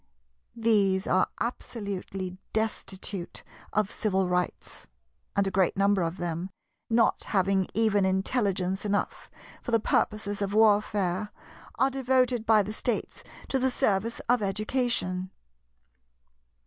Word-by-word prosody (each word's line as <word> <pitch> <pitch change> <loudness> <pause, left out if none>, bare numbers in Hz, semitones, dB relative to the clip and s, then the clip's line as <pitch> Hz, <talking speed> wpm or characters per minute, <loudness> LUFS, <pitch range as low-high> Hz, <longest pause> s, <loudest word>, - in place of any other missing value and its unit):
These 205 -5 +2
are 185 - +3
absolutely 195 -5 -4
destitute 200 -4 -3 0.3
of 210 -1 +1
civil 190 -3 0
rights; 180 -1 -3 0.5
and 200 - +3
a 195 - -1
great 190 0 +2
number 200 -1 +3
of 165 +1 -2
them, 175 +1 -3 0.4
not 230 -1 +2
having 190 -1 +1
even 215 -2 +3
intelligence 190 -1 0
enough 205 -1 -2 0.3
for - - -7
the 230 -1 +3
purposes 205 -1 0
of 200 0 -1
warfare, 205 -2 +3 0.5
are 270 - +3
devoted 255 -3 +1
by 215 -2 +6
the 210 +2 -5
States 235 +1 -3 0.3
to 270 - +1
the 260 +1 +2
service 230 -3 0
of 245 -1 +2
education. 200 -2 -1
205 Hz, 120 wpm, -28 LUFS, 190-225 Hz, 0.5 s, by